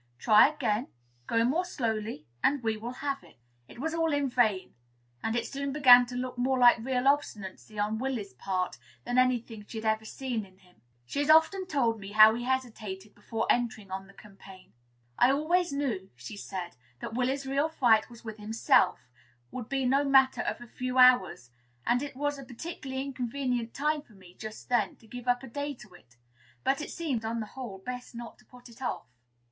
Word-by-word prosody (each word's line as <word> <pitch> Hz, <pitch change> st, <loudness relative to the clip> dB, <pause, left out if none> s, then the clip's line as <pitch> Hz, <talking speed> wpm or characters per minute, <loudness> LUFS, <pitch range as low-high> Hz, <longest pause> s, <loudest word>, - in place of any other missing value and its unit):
Try 210 Hz, -, +6 dB
again; 250 Hz, -5 st, -1 dB, 0.4 s
go 230 Hz, 0 st, +2 dB
more 310 Hz, +9 st, +1 dB
slowly, 220 Hz, -, -3 dB, 0.2 s
and 280 Hz, -2 st, +2 dB
we 220 Hz, -1 st, 0 dB
will 220 Hz, +2 st, -6 dB, 0.2 s
have 275 Hz, -1 st, -2 dB
it." -, -, -19 dB, 0.3 s
It -, -, -14 dB
was 320 Hz, +6 st, -3 dB
all 330 Hz, -1 st, +1 dB
in 285 Hz, -2 st, +1 dB
vain; 220 Hz, -7 st, +1 dB, 0.5 s
and 225 Hz, +1 st, -1 dB
it 235 Hz, -1 st, 0 dB
soon 280 Hz, +1 st, -4 dB
began 250 Hz, -4 st, +7 dB
to 245 Hz, -, -7 dB
look 250 Hz, 0 st, -4 dB
more 260 Hz, +1 st, +1 dB
like 240 Hz, -1 st, +6 dB
real 250 Hz, +2 st, -1 dB
obstinacy 215 Hz, -7 st, -1 dB
on 210 Hz, +1 st, 0 dB
Willy's 245 Hz, -6 st, -3 dB
part 185 Hz, -9 st, -3 dB, 0.2 s
than 245 Hz, +1 st, +1 dB
any 255 Hz, -1 st, +4 dB
thing 225 Hz, -2 st, -11 dB
she 225 Hz, -, -8 dB
had 220 Hz, -, -8 dB
ever 220 Hz, 0 st, +1 dB
seen 245 Hz, -1 st, -3 dB
in 190 Hz, -1 st, -17 dB
him. 180 Hz, -2 st, -25 dB, 0.2 s
She 280 Hz, -, -4 dB
has 290 Hz, +1 st, 0 dB
often 320 Hz, +5 st, +5 dB
told 240 Hz, -9 st, +1 dB
me 200 Hz, 0 st, -9 dB
how 215 Hz, +1 st, +8 dB
she 240 Hz, -, -4 dB
hesitated 220 Hz, -6 st, -3 dB
before 225 Hz, +2 st, -3 dB
entering 235 Hz, -5 st, 0 dB
on 190 Hz, 0 st, -5 dB
the 195 Hz, -, -17 dB
campaign. 195 Hz, -, -15 dB, 0.5 s
"I 245 Hz, -, +6 dB
always 335 Hz, +5 st, +1 dB
knew," 245 Hz, -10 st, -2 dB
she 125 Hz, -, -9 dB
said, 185 Hz, -6 st, -6 dB, 0.2 s
"that -, -, -6 dB
Willy's 260 Hz, +3 st, 0 dB
first 270 Hz, -, -6 dB
real 285 Hz, +3 st, +1 dB
fight 235 Hz, -8 st, +3 dB
with 230 Hz, -2 st, -9 dB
himself 210 Hz, -, +2 dB, 0.4 s
would 245 Hz, -3 st, -6 dB
be 270 Hz, -1 st, 0 dB
no 270 Hz, +3 st, +3 dB
matter 270 Hz, -1 st, +4 dB
of -, -, -3 dB
a -, -, -8 dB
few 255 Hz, +2 st, -4 dB
hours; 245 Hz, -, +5 dB, 0.3 s
and 245 Hz, +1 st, +2 dB
it 285 Hz, -2 st, -6 dB
was 290 Hz, +1 st, -2 dB
a -, -, -8 dB
particularly 265 Hz, 0 st, -6 dB
inconvenient 250 Hz, -2 st, -3 dB
time 300 Hz, +2 st, 0 dB
for 240 Hz, -, -22 dB
me, 185 Hz, -3 st, -16 dB
just 215 Hz, +3 st, -9 dB
then, 240 Hz, -4 st, +1 dB
to -, -, -22 dB
give 245 Hz, +3 st, -9 dB
up 245 Hz, +1 st, +2 dB
a -, -, -7 dB
day 285 Hz, +3 st, -4 dB
to 215 Hz, -6 st, -15 dB
it. 120 Hz, -9 st, -20 dB, 0.5 s
But 275 Hz, +2 st, +1 dB
it -, -, -5 dB
seemed, 285 Hz, -10 st, -3 dB
on 230 Hz, +1 st, -2 dB
the 220 Hz, -, -3 dB
whole, 240 Hz, -7 st, -7 dB
best 250 Hz, +5 st, -7 dB
not 235 Hz, 0 st, -9 dB
to -, -, -22 dB
put 250 Hz, 0 st, -15 dB
it 235 Hz, +2 st, -16 dB
off." 255 Hz, -, -3 dB
245 Hz, 205 wpm, -29 LUFS, 215-270 Hz, 0.5 s, how